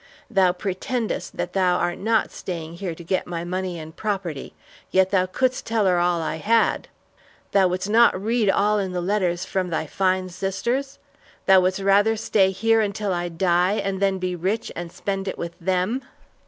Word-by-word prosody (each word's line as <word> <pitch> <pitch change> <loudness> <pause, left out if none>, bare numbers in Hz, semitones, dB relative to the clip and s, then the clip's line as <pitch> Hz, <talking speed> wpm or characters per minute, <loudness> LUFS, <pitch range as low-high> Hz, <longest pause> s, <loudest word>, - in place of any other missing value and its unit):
Thou 190 -4 +4
pretendest 210 +6 -3
that - - -3
thou 185 -2 +3
art 175 -1 -1
not 220 +2 +1
staying 170 -2 -6
here 175 -3 -4
to 170 - -11
get 185 +2 -1
my 170 -1 -4
money 180 0 -3
and 160 0 -9
property, 190 -9 -4 0.3
yet 190 0 +3
thou 185 -2 +2
couldst 255 +6 -1
tell 225 -2 +1
her 180 -2 +3
all 175 -1 +1
I 160 - -2
had. 225 +7 +2 0.6
Thou 195 -2 +4
wouldst 185 +2 -2
not 225 -2 +4
read 220 +1 +1
all 210 +2 +3
in 190 -2 -3
the 180 - -1
letters 180 -1 0
from 185 -2 -2
thy 160 -1 -1
fine 185 +3 0
sisters? 235 +9 -2 0.5
Thou 190 -1 +7
wouldst 185 +2 0
rather 205 +3 +3
stay 200 -2 +3
here 225 +3 +2
until 205 -1 -1
I 175 0 -2
die 175 +2 +2
and 195 -2 -2
then 195 -1 +2
be 180 -1 -2
rich 190 +6 -2
and 170 -1 -6
spend 195 +1 -3
it 190 - -3
with 170 0 -5
them!" 185 +8 0
190 Hz, 185 wpm, -23 LUFS, 180-205 Hz, 0.6 s, Thou